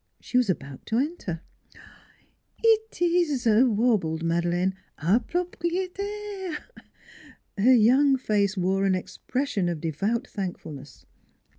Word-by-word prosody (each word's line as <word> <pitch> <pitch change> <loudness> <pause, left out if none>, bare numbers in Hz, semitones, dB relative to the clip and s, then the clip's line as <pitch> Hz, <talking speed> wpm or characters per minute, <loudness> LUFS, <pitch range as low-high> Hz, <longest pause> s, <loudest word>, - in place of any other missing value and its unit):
She - - -9
was 250 -4 +4
about 140 -7 -3
to 225 - 0
enter. 255 - -2 0.6
" - - -29 0.4
It 445 -1 +2
is," 340 -7 +1
warbled 215 -8 +3
Madeleine, 175 +2 +1 0.2
" - - -46
our 185 +9 +3
proprie 355 +5 -2
tairef 400 -3 -5 0.6
" - - -22
Her 260 - +8
young 265 +5 +5
face 205 -5 0
wore 190 +2 +1
an 190 -1 +3
expression 205 +1 -2
of 170 -3 -3
devout 195 - -1
thankfulness. 160 -8 -7
225 Hz, 125 wpm, -26 LUFS, -, 0.6 s, Her